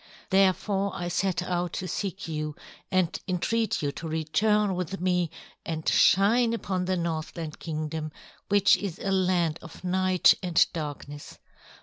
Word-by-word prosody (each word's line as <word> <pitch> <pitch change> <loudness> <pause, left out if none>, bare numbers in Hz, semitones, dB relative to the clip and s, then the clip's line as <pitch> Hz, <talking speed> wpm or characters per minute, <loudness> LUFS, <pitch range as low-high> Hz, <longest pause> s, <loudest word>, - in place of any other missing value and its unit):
Therefore 195 +1 +2
I 175 0 -3
set 180 0 0
out 180 -1 -2
to 185 - -3
seek 195 0 -4
you 155 -2 -3 0.4
and 185 -2 +1
entreat 205 +2 0
you 145 - 0
to 165 +3 -7
return 195 +7 +1
with 180 +1 -3
me 180 -2 +1 0.3
and 160 -2 -4
shine 225 +5 +4
upon 185 -5 -2
the 185 0 0
Northland 165 -1 -4
Kingdom, 155 -1 -4 0.4
which 200 -1 +5
is 190 -4 -5
a 195 - -3
land 180 -4 +1
of 165 - -12
night 185 0 +4
and 175 -3 +4
darkness. 145 -2 -6
180 Hz, 140 wpm, -27 LUFS, 160-195 Hz, 0.4 s, which